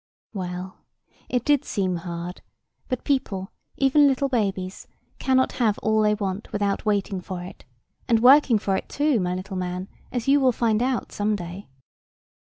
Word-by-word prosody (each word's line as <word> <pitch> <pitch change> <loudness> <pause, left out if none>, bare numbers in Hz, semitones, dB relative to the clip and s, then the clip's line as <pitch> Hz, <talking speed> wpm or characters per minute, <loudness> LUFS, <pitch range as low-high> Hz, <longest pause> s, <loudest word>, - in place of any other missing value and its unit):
Well, 185 -1 -5 0.5
it 250 -1 0
did 290 -1 +3
seem 185 -8 -1
hard: 170 +1 -6 0.5
but 255 -2 -3
people, 210 -8 -1 0.3
even 280 +2 +5
little 275 0 +1
babies, 195 -6 -2 0.3
cannot 260 -1 +2
have 215 -3 +3
all 220 0 +3
they 210 0 +3
want 200 0 -4
without 205 0 -1
waiting 200 -2 0
for 180 -1 -6
it, 180 - -11 0.4
and 230 -3 +4
working 255 0 +6
for 195 -1 0
it - - -4
too, 290 -4 +1
my 180 -1 -1
little 190 +1 -5
man, 180 +1 -4 0.2
as 245 -1 -3
you 280 +1 +5
will 260 -2 +4
find 225 -1 +1
out 255 -1 -1
some 210 +1 0
day. 180 +1 -7
210 Hz, 165 wpm, -24 LUFS, 185-255 Hz, 0.5 s, working